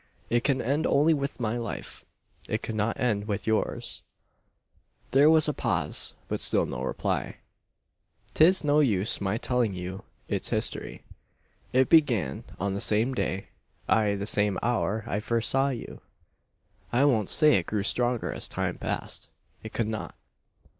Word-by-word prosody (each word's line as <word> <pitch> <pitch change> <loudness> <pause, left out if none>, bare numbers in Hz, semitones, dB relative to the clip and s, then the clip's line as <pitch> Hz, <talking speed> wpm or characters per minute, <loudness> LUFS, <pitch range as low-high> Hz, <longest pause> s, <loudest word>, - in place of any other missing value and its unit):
It 120 0 +2
can 140 -2 +1
end 145 +6 0
only 150 +4 +4
with 140 -2 -3
my 115 0 -1
life. 115 - -7 0.4
It - - -2
could 110 - -4
not 110 +1 -1
end 105 -4 0
with 105 -1 -3
yours." 110 -1 -2 1.1
There 140 +3 +6
was 160 -1 +4
a 150 - 0
pause, - - 0
but - - -3
still - - +5
no 60 - -5
reply. 65 - -2 1.0
"'Tis 175 +4 +5
no 150 0 +3
use 110 -9 +1
my 95 +2 -1
telling 120 -5 0
you 90 +2 -6 0.2
its - - -2
history. - - -3 0.7
It 130 +1 +3
began 120 - +2
on 100 +2 -1
the 100 - -3
same 110 +5 +3
day 95 -6 -3 0.4
ay, 105 -2 +2
the 100 0 -4
same 105 -2 +1
hour 110 -2 0
I 105 -2 -2
first 115 +1 -1
saw 135 +1 +2
you. 125 -4 -7 0.9
"I 125 +4 +3
won't 110 -8 +2
say 150 -1 +6
it 90 - -3
grew 105 -2 -1
stronger 120 +2 0
as - - -2
time - - -3
passed. - - -4 0.3
It 110 - -8
could 115 - -1
not. 110 -5 -5
115 Hz, 160 wpm, -27 LUFS, 105-135 Hz, 1.1 s, There